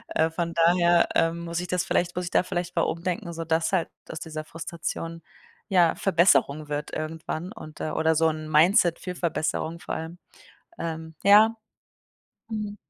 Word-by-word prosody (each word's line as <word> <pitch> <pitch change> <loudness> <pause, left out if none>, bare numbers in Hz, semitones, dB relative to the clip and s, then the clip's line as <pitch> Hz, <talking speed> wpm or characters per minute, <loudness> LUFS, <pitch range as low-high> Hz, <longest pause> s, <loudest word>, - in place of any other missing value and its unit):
Äh, 160 +1 +3
von 170 +1 -3
daher, 170 +1 +4
ähm, 165 +1 +2
muss 170 0 -3
ich 180 - -4
das 180 0 -1
vielleicht 175 0 0
muss 180 0 -2
ich - - -4
da - - +3
vielleicht 175 -1 -4
mal 165 - +3
umdenken, 175 +2 -3
so 165 0 -5
dass 160 0 +1
halt 185 -4 +1 0.2
aus 160 - -6
dieser 155 -2 -6
Frustration, 165 0 -6 0.5
ja, 175 -4 +4
Verbesserung 155 -5 +3
wird 150 0 -4
irgendwann 160 +3 -4
und, 155 -9 -11
äh - - -2
oder 160 0 +2
so 160 +1 +3
'n 155 0 -5
Mindset 170 +3 +4
für 180 -1 -6
Verbesserung 165 -1 -2
vor - - -5
allem. 165 +2 -6 0.6
Ähm, 160 -1 -5
ja. 215 +3 +7 0.9
Mhm. 210 -2 -4
170 Hz, 170 wpm, -26 LUFS, 160-180 Hz, 0.9 s, ja